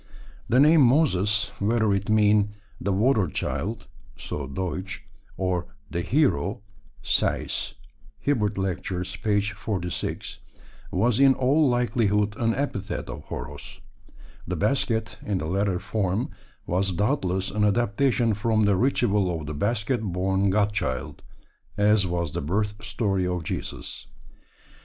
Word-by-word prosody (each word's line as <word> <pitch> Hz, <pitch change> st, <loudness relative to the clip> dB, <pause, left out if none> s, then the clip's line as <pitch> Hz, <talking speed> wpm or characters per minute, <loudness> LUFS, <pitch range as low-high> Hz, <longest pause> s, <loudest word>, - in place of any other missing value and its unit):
The 125 Hz, -, +4 dB
name 155 Hz, +2 st, +7 dB
Moses, 105 Hz, -, +3 dB
whether 110 Hz, 0 st, +2 dB
it 100 Hz, +1 st, -1 dB
mean 105 Hz, -1 st, +3 dB, 0.2 s
"the 100 Hz, -, -1 dB
water 105 Hz, 0 st, +3 dB
child" 110 Hz, +7 st, -3 dB, 0.3 s
(so 65 Hz, +1 st, -5 dB
Deutsch) 95 Hz, +6 st, -4 dB, 0.3 s
or 90 Hz, -2 st, -1 dB, 0.2 s
"the 85 Hz, -, -1 dB
hero" 125 Hz, -, +1 dB, 0.4 s
(Sayce, -, -, 0 dB, 0.4 s
Hib. 105 Hz, -8 st, 0 dB
Lect. 95 Hz, -3 st, -2 dB, 0.3 s
p. 105 Hz, -2 st, +2 dB
46), 100 Hz, -3 st, -4 dB, 0.5 s
was 110 Hz, +5 st, +2 dB
in 135 Hz, -1 st, +6 dB
all 140 Hz, +3 st, +3 dB
likelihood 105 Hz, -4 st, +1 dB
an 115 Hz, -1 st, +1 dB
epithet 105 Hz, -, -3 dB
of 75 Hz, +2 st, -9 dB
Horos. 75 Hz, 0 st, -7 dB, 0.7 s
The 90 Hz, -, -2 dB
basket, 110 Hz, -, 0 dB
in 100 Hz, -2 st, -1 dB
the 80 Hz, -, -3 dB
latter 95 Hz, +2 st, 0 dB
form, 95 Hz, +2 st, -1 dB, 0.3 s
was 95 Hz, +2 st, 0 dB
doubtless 95 Hz, -, 0 dB
an 105 Hz, +1 st, 0 dB
adaptation 115 Hz, +2 st, +2 dB
from 110 Hz, +1 st, +1 dB
the 100 Hz, -1 st, +4 dB
ritual 100 Hz, -8 st, +1 dB
of -, -, -7 dB
the 75 Hz, -, -4 dB
basket 110 Hz, -, 0 dB
born 95 Hz, 0 st, 0 dB
God 105 Hz, +1 st, +2 dB
Child, 65 Hz, -11 st, -3 dB, 0.6 s
as 105 Hz, -1 st, +4 dB
was 85 Hz, -3 st, -2 dB
the -, -, -3 dB
birth 105 Hz, +7 st, -2 dB
story 100 Hz, -3 st, 0 dB
of 90 Hz, -2 st, -2 dB
Jesus. -, -, -5 dB
105 Hz, 130 wpm, -25 LUFS, 95-115 Hz, 0.7 s, name